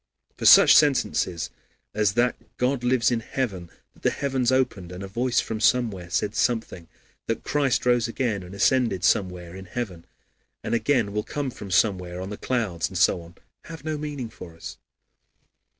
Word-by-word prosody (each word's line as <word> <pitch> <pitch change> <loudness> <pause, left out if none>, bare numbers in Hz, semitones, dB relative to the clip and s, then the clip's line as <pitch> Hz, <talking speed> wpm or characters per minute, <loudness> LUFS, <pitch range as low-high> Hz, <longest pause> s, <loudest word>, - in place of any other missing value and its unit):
For - - 0
such - - +9
sentences 90 - +2 0.4
as 105 -2 +1
that 120 +2 +2 0.2
God 125 0 0
lives 125 -1 +2
in 120 - +1
heaven, 105 -8 -4 0.2
that - - -23
the - - +3
heavens 130 -3 0
opened 110 -9 0
and 90 +2 -7
a - - -5
voice 120 +5 0
from 110 - -3
somewhere 100 -4 +1
said 100 +4 -1
something, 110 -8 -1 0.4
that 115 - -2
Christ 140 -5 0
rose 120 -2 +3
again, 115 -4 -2
and 90 +2 -10
ascended 115 -3 +2
somewhere 90 -3 0
in 95 0 -9
heaven, 90 -5 -5 0.6
and - - -3
again 115 -4 +1
will 105 - 0
come 140 +4 -4
from 105 -4 -9
somewhere 90 -3 +1
on 95 +2 -6
the 105 - -5
clouds, 95 -11 -1
and 95 - -5
so 90 0 +3
on, 85 +1 -15 0.3
have 160 -2 -9
no 155 -1 -1
meaning 145 -5 -5
for 85 -2 -11
us. 80 - -9
110 Hz, 175 wpm, -25 LUFS, 90-125 Hz, 0.6 s, such